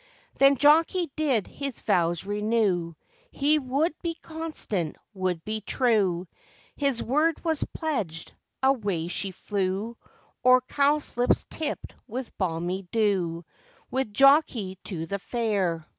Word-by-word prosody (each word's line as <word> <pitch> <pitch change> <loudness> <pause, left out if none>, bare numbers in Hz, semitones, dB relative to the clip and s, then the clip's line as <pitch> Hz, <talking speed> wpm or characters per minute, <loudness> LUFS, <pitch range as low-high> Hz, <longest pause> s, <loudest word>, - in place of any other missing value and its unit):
Then 275 0 +6
Jockey 320 +4 +4
did 275 -10 +1
his 275 -3 -6
vows 175 0 +1
renew; 205 -5 0 0.3
He 300 - +2
would 280 +5 0
be 335 -1 -2
constant, 315 - -4 0.2
would 185 -4 -2
he 215 0 -3
true, 200 -7 +1 0.5
His 275 -4 0
word 305 +6 +1
was 320 -3 +1
pledged; 205 - -3 0.3
away 205 -11 +1
she 195 +2 -2
flew, 195 +3 -2 0.5
O'er 255 0 +7
cowslips 280 -2 +1
tipped 310 -2 -4
with 250 +1 -6
balmy 180 +1 -2
dew, 185 -7 0 0.5
With 260 -4 -1
Jockey 250 - +4
to 165 -5 -4
the 200 +4 -3
fair. 195 -8 -1
220 Hz, 115 wpm, -26 LUFS, 185-280 Hz, 0.5 s, O'er